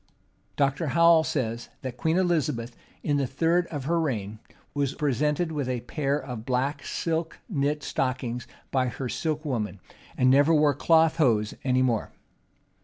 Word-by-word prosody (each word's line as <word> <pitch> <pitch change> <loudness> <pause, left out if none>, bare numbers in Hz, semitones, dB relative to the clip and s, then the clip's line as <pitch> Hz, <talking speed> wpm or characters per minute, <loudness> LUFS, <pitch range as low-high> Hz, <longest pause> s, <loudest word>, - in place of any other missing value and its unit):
Dr. 140 +3 +1
Howell 170 -1 +6
says,[*] 120 -6 -2
that 130 -2 -4
Queen 160 +7 0
Elizabeth, 140 -10 0 0.3
in 145 -1 +1
the 140 -2 0
third 165 +6 +1
of 145 -4 -5
her 170 +3 +1
reign, 110 -9 -2 0.3
was 140 -2 -1
presented 150 +3 0
with 145 -4 -2
a 125 -2 -2
pair 140 +3 -1
of 125 -6 -6
black 135 +3 -1
silk 165 0 -2
knit 150 - -1
stockings 125 -2 -2 0.2
by 130 -2 +2
her 125 +1 -4
silk 155 +4 -2
woman, 105 -8 -2 0.4
and 130 0 +4
never 145 +4 +5
wore 150 -1 +4
cloth 160 +3 +3
hose 115 -8 +2
any 130 -1 +2
more. 120 -4 0
140 Hz, 155 wpm, -26 LUFS, 125-160 Hz, 0.4 s, Howell